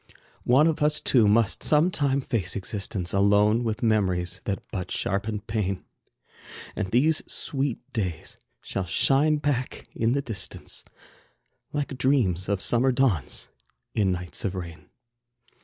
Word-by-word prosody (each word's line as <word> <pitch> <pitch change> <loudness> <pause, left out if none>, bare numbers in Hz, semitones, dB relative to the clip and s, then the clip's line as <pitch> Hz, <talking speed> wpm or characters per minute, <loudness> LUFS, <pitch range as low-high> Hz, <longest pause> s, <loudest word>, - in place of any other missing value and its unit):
One 130 +5 +5
of 160 -2 +1
us 150 0 +2
two 115 -5 +4
must 110 0 +2
sometime 150 -3 +2
face 110 -9 -1
existence 100 -2 -3
Alone 105 +3 +4
with 110 -1 -2
memories 95 -5 +1
that 100 -2 -1
but 90 -2 -4
sharpen 105 +2 -2
pain. 105 -3 -3 0.9
And 105 -3 -2
these 145 +9 +3
sweet 135 -4 -1 0.2
days 90 -8 -4 0.2
shall 95 -2 -4
shine 145 - +3
back 145 -4 -2
in 115 +1 +1
the 140 0 0
distance, 110 -9 -5 0.9
Like 145 -3 -3
dreams 105 -9 +1
of 100 -2 0
summer 125 +2 +3
dawns, 120 - 0 0.4
in 100 -4 +2
nights 90 -3 -4
of 95 -1 -2
rain. 85 -2 -8
110 Hz, 130 wpm, -26 LUFS, 95-135 Hz, 0.9 s, One